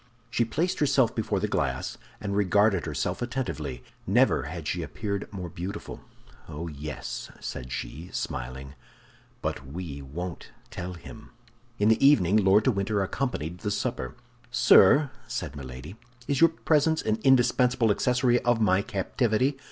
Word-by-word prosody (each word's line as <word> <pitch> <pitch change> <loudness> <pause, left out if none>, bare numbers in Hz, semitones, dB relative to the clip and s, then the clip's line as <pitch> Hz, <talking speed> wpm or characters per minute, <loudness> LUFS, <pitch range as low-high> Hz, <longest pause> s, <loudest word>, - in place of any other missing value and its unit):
She 120 - +2
placed 170 +11 -1
herself 135 -5 +3
before 110 - -1
the - - -1
glass, - - -2 0.2
and 100 -1 -3
regarded 100 -1 +3
herself 80 - -2
attentively; 80 - -4 0.2
never - - +3
had 80 0 -6
she 90 - -1
appeared 100 +5 -4
more 95 -4 -5
beautiful. 90 +5 -6 0.5
"Oh, 80 +4 -5
yes," 75 -1 -6
said 65 0 -6
she, 70 +6 -6
smiling, 65 +2 -5 0.7
"but - - -2
we 70 0 -7
won't 85 +6 -6 0.2
tell 90 +1 -5
him!" 110 +6 -12 0.5
In 105 +1 +3
the 110 +3 +3
evening 110 -10 +5
Lord 100 +1 +5
de 130 - +3
Winter 100 -1 0
accompanied 90 - -3
the 105 - -3
supper. 100 -11 -3 0.3
"Sir," 145 -1 +6 0.2
said - - -4
Milady, 65 - -8 0.3
"is 140 0 0
your 165 - +8
presence 160 0 +1
an 110 0 0
indispensable 125 -2 +4
accessory 125 +2 +2
of 120 -2 +1
my 100 -3 +3
captivity? 115 +7 0
100 Hz, 145 wpm, -27 LUFS, 80-120 Hz, 0.7 s, your